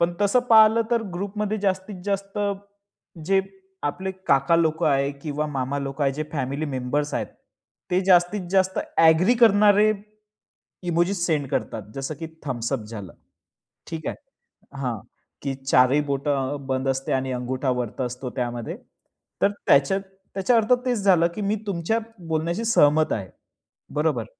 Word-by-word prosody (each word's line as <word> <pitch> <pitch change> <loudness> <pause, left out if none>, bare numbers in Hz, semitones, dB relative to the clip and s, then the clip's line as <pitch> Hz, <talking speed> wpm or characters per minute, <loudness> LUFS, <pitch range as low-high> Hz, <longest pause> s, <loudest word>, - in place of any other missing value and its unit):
पण 170 +1 +2
तसं 205 +4 +3
पाहिलं 220 0 +7
तर 235 -1 +2
ग्रुपमध्ये 205 +3 -3
जास्तीत 190 -1 -2
जास्त 200 0 -3 0.9
जे, 195 +1 +4 0.4
आपले 185 +6 -2 0.2
काका 140 +4 +4
लोक 160 0 +1
आहे 140 -1 +2
किंवा 150 0 -2
मामा 140 -1 -2
लोक 140 +1 -5
आहे, 135 -1 +2
जे 150 +3 -3
फॅमिली 140 +1 -2
मेंबर्स 140 +2 -2
आहेत. - - -1 0.6
ते 180 +1 +3
जास्तीत 180 0 +3
जास्त 190 0 +2 0.2
ॲग्री 165 +8 +5
करणारे, 210 -1 +6 0.9
इमोजीस 175 +1 0
सेंड 150 -5 0
करतात. 115 -5 -2
जसं 135 +3 -4
की 165 - -4 0.2
थंब्स 120 -2 -2
अप 135 - 0
झालं. 105 -5 -8 0.8
ठीक 160 -2 -5
आहे - - -3 0.7
हां, 125 -3 -2 0.4
की 140 -1 -2
4ही 135 +1 +3
बोटं 140 0 -1
बंद 130 0 -1
असते 135 0 -2
आणि 130 0 -1
अंगुठा 130 +2 -2
वरती 120 +1 -4
असतो 125 +1 -4
त्यामध्ये. 120 -2 -3 0.6
तर 200 - +4 0.2
त्याच्यात 140 +8 +4 0.3
त्याच्या 195 +6 +2
अर्थ 225 +2 +3
तेच 245 -3 +1
झालं, 180 -4 +5
की 215 - -4
मी 205 +1 0
तुमच्या 195 +4 0 0.3
बोलण्याशी 165 +7 -1
सहमत 155 -8 +4
आहे. 95 -4 -4 0.6
बरोबर. 150 -6 0
155 Hz, 145 wpm, -24 LUFS, 135-195 Hz, 0.9 s, पाहिलं